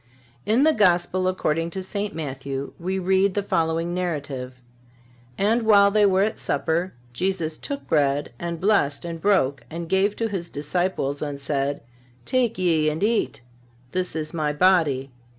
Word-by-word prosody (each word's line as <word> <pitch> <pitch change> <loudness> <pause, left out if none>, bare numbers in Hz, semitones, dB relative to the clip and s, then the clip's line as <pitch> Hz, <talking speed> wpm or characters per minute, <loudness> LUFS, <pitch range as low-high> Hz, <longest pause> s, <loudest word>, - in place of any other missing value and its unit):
In 230 +6 +4
the 315 +1 +5
Gospel 185 -3 +2
according 165 -3 0
to 190 +2 -5
St. 205 +2 -3
Matthew 135 -2 -5
we 185 +2 -2
read 190 +1 +2
the 205 - 0
following 165 -1 0
narrative: 140 -8 -3 0.8
"And 220 +4 +2
while 200 -2 +5
they 210 0 +4
were 190 0 +3
at 215 - -2
supper, 165 +5 -1 0.2
Jesus 170 +1 -1
took 280 - -6
bread, 145 -1 +1
and 170 -1 -4
blessed 170 -7 +1
and 165 -1 -5
broke 180 -9 +2
and 170 +1 -5
gave 195 +4 +2
to 230 - -1
His 185 -5 -4
disciples 145 -2 -2
and 145 -2 -4
said: 140 0 -1 0.4
Take 245 - +1
ye 165 -4 +2
and 155 +5 -3
eat. 220 - 0 0.5
This 185 -2 -2
is 155 -1 -4
My 155 -3 0
body. 150 -5 +2
175 Hz, 155 wpm, -24 LUFS, 150-195 Hz, 0.8 s, the